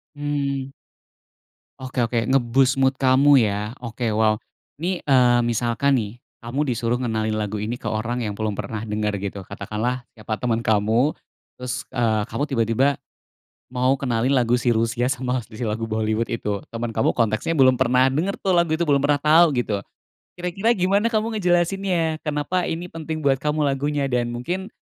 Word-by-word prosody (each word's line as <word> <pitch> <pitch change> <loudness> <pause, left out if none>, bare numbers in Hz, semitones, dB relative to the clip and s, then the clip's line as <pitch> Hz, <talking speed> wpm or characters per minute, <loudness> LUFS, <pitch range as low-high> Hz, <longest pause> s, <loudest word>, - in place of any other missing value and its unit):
Hmm. 140 -2 -2 1.1
Oke 130 -1 -1
oke. 115 0 -1
Nge-boost 130 +1 +3
mood 135 0 +3
kamu 135 +1 +5
ya? 105 -1 -1
Oke, 115 -1 -3
wow. 110 0 +3 0.4
Ini, 175 +4 -2
eee, 125 -3 +4
misalkan 120 +3 +1
nih, 115 0 -4 0.2
kamu 135 +5 -2
disuruh 120 0 0
ngenalin 110 -3 -1
lagu 105 -1 -2
ini 110 +4 -4
ke - - -4
orang 120 +3 -2
yang 105 -3 -3
belum 110 0 -1
pernah 110 +2 -5
denger 105 -1 -2
gitu, 100 0 -5
katakanlah 120 +4 -3
siapa 110 -1 -5
temen 115 0 -1
kamu 110 +5 +2 0.4
terus, 125 0 -4
eee, 110 -4 +1
kamu 145 - -2
tiba-tiba 115 0 +1 0.9
mau 130 +1 +2
kenalin 125 -2 0
lagu 120 -2 +2
si 120 0 0
Rusia 115 +2 0
sama 130 -1 -1
si 110 0 -18
si 120 - -3
lagu 110 +1 -3
Bollywood 110 +1 -1
itu. 105 -4 -2
Temen 115 0 -4
kamu 110 - +1
konteksnya 115 +8 0
belum 130 -2 +6
pernah 125 +1 +4
denger 180 +8 -1
tuh 190 - 0
lagu 170 -1 +3
itu, 170 - 0
belum 140 -3 +3
pernah 145 +1 +3
tau 155 +4 +5
gitu. 120 -7 -1 0.6
Kira-kira 185 +6 0
gimana 200 +4 +2
kamu 225 0 -1
ngejelasinnya? 175 -2 +1
Kenapa 150 +4 -1
ini 170 +2 -4
penting 160 -1 -5
buat 135 -1 +2
kamu 150 0 0
lagunya? 145 +1 0
Dan 125 -3 0
mungkin, 180 +10 -4
125 Hz, 165 wpm, -22 LUFS, 115-145 Hz, 1.1 s, belum